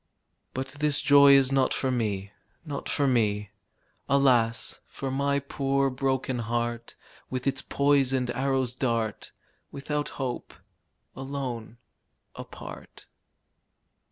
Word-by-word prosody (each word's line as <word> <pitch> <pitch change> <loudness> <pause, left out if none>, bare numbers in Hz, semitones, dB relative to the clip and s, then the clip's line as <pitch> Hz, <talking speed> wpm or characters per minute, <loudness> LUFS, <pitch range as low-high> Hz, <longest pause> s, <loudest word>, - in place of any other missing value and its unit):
But 130 +1 -3
this 150 -1 +2
joy 140 -1 +7
is 135 -1 +5
not 135 -1 +2
for 130 - 0
me, 100 -5 -2 0.3
Not 145 -3 -5
for 145 - +1
me. 105 -5 +1 0.6
Alas! 125 -4 +2
for 135 -1 -5
my 140 +1 +1
poor 140 -1 0
broken 130 -1 -1
heart, 120 0 -3 0.3
With 130 -1 -4
its 135 -1 0
poisoned 135 -3 +2
arrow's 130 -1 0
dart. 115 -5 -2 0.4
Without 145 +1 -3
hope, 130 -3 -4 0.6
alone, 130 -4 -5 0.6
apart. - - -10
130 Hz, 105 wpm, -27 LUFS, 120-140 Hz, 0.6 s, joy